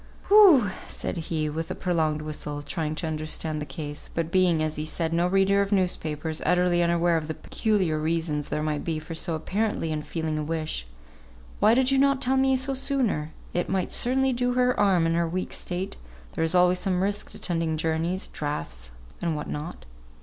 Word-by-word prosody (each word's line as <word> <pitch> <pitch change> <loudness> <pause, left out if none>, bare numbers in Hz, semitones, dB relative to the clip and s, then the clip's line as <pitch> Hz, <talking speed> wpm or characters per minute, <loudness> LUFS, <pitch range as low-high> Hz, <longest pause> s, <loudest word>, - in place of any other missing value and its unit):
"Whew 360 - +7
" - - -13
said - - -4
he, 155 -2 0
with 160 +2 -4
a - - -3
prolonged 160 -4 0
whistle, 150 -1 -4
trying 155 0 -3
to 165 - -4
understand 155 0 -2
the 150 - -5
case, 145 +1 -6
but 165 -1 -2
being, 175 -4 +3
as 155 0 -2
he 150 - -3
said, 160 +1 -2
no 170 +1 +2
reader 195 +1 +3
of 200 +1 -1
newspapers, 160 -5 -1
utterly 180 0 +3
unaware 170 0 +2
of 155 -1 -3
the 160 - -4
peculiar 190 -8 0
reasons 155 -2 -1
there 150 - -1
might 150 -1 -1
be 165 -2 -2
for 155 +1 -7
so 165 +1 -1
apparently 195 0 -1
unfeeling 155 +1 -3
a - - -2
wish, 155 - -3 0.7
"Why 220 - +5
did 260 +1 +3
you 270 - +3
not 275 -1 +3
tell 265 0 +1
me 265 0 +3
so 265 +1 0
sooner? 255 - 0 0.2
It 175 - -1
might 190 -1 -1
certainly 265 +1 +2
do 245 0 0
her 250 0 +3
harm 195 -6 +3
in 165 - +1
her 170 0 +1
weak 185 +2 -3
state; 180 +2 -3 0.3
there - - -2
is 165 +2 +2
always 180 0 +4
some 185 -1 0
risk 205 +1 -2
attending 165 -3 -1
journeys 165 +3 -1
draughts, - - -5 0.3
and 170 -2 0
what 150 - -4
not. 150 +4 -6
170 Hz, 195 wpm, -26 LUFS, 155-195 Hz, 0.7 s, Whew